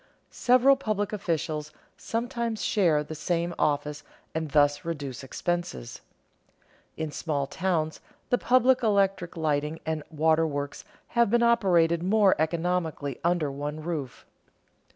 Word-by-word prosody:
Several 255 Hz, +2 st, +4 dB
public 215 Hz, -5 st, -2 dB
officials 160 Hz, -5 st, -2 dB, 0.2 s
sometimes 235 Hz, -1 st, -3 dB
share 165 Hz, -8 st, +2 dB
the 155 Hz, -, -8 dB
same 170 Hz, +3 st, -1 dB
office 145 Hz, 0 st, 0 dB, 0.3 s
and 160 Hz, -1 st, -2 dB
thus 145 Hz, +2 st, +3 dB
reduce 145 Hz, -6 st, -5 dB
expenses. 170 Hz, -, -4 dB, 1.0 s
In 160 Hz, -1 st, -3 dB
small 145 Hz, -2 st, -2 dB
towns 160 Hz, 0 st, -1 dB, 0.3 s
the 245 Hz, -, +3 dB
public 255 Hz, +1 st, +4 dB
electric 195 Hz, -6 st, +1 dB
lighting 150 Hz, 0 st, -1 dB
and 160 Hz, -1 st, -2 dB
waterworks 155 Hz, -2 st, 0 dB, 0.2 s
have 235 Hz, -3 st, +3 dB
been 235 Hz, +2 st, +3 dB
operated 175 Hz, -8 st, +3 dB
more 200 Hz, +1 st, +4 dB
economically 160 Hz, -4 st, -1 dB
under 170 Hz, -4 st, +1 dB
one 145 Hz, +2 st, -5 dB
roof. 155 Hz, -7 st, -5 dB
165 Hz, 115 wpm, -27 LUFS, 150-200 Hz, 1.0 s, Several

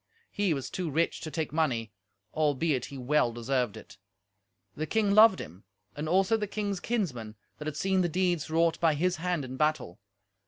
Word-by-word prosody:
He 200 Hz, -6 st, +1 dB
was 135 Hz, -, -5 dB
too 180 Hz, -3 st, -3 dB
rich 165 Hz, +4 st, 0 dB
to 155 Hz, -, -5 dB
take 155 Hz, -2 st, -3 dB
money, 125 Hz, -9 st, 0 dB, 0.4 s
albeit 150 Hz, -3 st, +1 dB
he 140 Hz, -, -9 dB
well 130 Hz, -1 st, +2 dB
deserved 120 Hz, -1 st, -1 dB
it; -, -, -13 dB, 0.8 s
the 155 Hz, +1 st, -3 dB
king 210 Hz, +2 st, +1 dB
loved 215 Hz, -1 st, +7 dB
him, 90 Hz, +6 st, -9 dB, 0.3 s
and 150 Hz, +1 st, -4 dB
also 195 Hz, +5 st, +3 dB
the 210 Hz, -1 st, -3 dB
king's 200 Hz, -2 st, -3 dB
kinsmen 140 Hz, -, -3 dB, 0.2 s
that 150 Hz, -, -6 dB
had 155 Hz, -1 st, -4 dB
seen 190 Hz, +2 st, +1 dB
the 175 Hz, -, +1 dB
deeds 175 Hz, -2 st, 0 dB
wrought 165 Hz, +1 st, +2 dB
by 160 Hz, -3 st, +3 dB
his 180 Hz, +4 st, 0 dB
hand 175 Hz, -3 st, -1 dB
in 130 Hz, 0 st, -7 dB
battle. 150 Hz, -, 0 dB
155 Hz, 185 wpm, -29 LUFS, 135-185 Hz, 0.8 s, loved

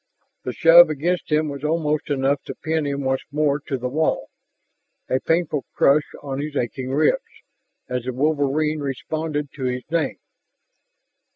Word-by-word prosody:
The 125 Hz, -, -1 dB
shove 165 Hz, +5 st, +7 dB
against 165 Hz, +4 st, -1 dB
him 155 Hz, +1 st, +2 dB
was 140 Hz, -1 st, -6 dB
almost 155 Hz, 0 st, 0 dB
enough 140 Hz, 0 st, +1 dB
to -, -, -6 dB
pin 160 Hz, -1 st, -1 dB
him 140 Hz, 0 st, -2 dB
once 130 Hz, 0 st, 0 dB
more 145 Hz, -1 st, +1 dB
to 135 Hz, -, -1 dB
the 125 Hz, 0 st, -3 dB
wall, 155 Hz, +5 st, -1 dB, 0.8 s
a 130 Hz, -, +1 dB
painful 165 Hz, -3 st, 0 dB
crush 145 Hz, +2 st, +4 dB
on 135 Hz, -1 st, -4 dB
his 150 Hz, 0 st, -5 dB
aching 130 Hz, +1 st, -2 dB
ribs, 145 Hz, +3 st, +2 dB, 0.7 s
as 125 Hz, -1 st, -3 dB
the 130 Hz, -, -3 dB
wolverine 150 Hz, +2 st, +1 dB
responded 150 Hz, +2 st, -3 dB
to 135 Hz, -3 st, -5 dB
his 125 Hz, 0 st, -2 dB
name. 170 Hz, -1 st, 0 dB
145 Hz, 155 wpm, -22 LUFS, 135-155 Hz, 0.8 s, shove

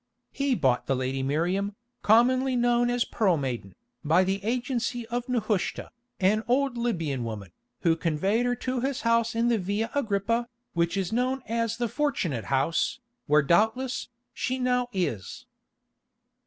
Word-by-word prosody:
He 275 Hz, -2 st, 0 dB
bought 130 Hz, -, +1 dB
the 135 Hz, -, +2 dB
lady 130 Hz, +1 st, -2 dB
Miriam, 180 Hz, +9 st, 0 dB, 0.3 s
commonly 255 Hz, +4 st, +4 dB
known 240 Hz, 0 st, +3 dB
as 245 Hz, 0 st, +1 dB
Pearl 190 Hz, -7 st, +1 dB
Maiden, 120 Hz, -9 st, -4 dB, 0.3 s
by 165 Hz, +5 st, +4 dB
the 195 Hz, +1 st, -1 dB
agency 240 Hz, +1 st, -1 dB
of 245 Hz, +1 st, -3 dB
Nehushta, 215 Hz, -5 st, -1 dB, 0.3 s
an 210 Hz, +3 st, +3 dB
old 265 Hz, +1 st, +2 dB
Libyan 165 Hz, -, -1 dB
woman, 105 Hz, -5 st, -6 dB, 0.3 s
who 165 Hz, -2 st, +3 dB
conveyed 190 Hz, +9 st, 0 dB
her 245 Hz, -, +1 dB
to 255 Hz, +1 st, -2 dB
his 265 Hz, +1 st, -2 dB
house 230 Hz, 0 st, +2 dB
in 230 Hz, +1 st, +2 dB
the 230 Hz, -2 st, +2 dB
Via 205 Hz, +5 st, -2 dB
Agrippa, 230 Hz, -2 st, 0 dB, 0.3 s
which 170 Hz, +2 st, 0 dB
is 190 Hz, +1 st, -1 dB
known 255 Hz, +3 st, 0 dB
as 230 Hz, 0 st, -1 dB
the 240 Hz, 0 st, 0 dB
'Fortunate 200 Hz, -, -1 dB
House,' 135 Hz, -, 0 dB, 0.3 s
where 150 Hz, 0 st, +5 dB
doubtless, 220 Hz, -, +1 dB, 0.2 s
she 255 Hz, -, -2 dB
now 250 Hz, -1 st, +1 dB
is." 145 Hz, -, -3 dB
220 Hz, 150 wpm, -27 LUFS, 165-245 Hz, 0.3 s, where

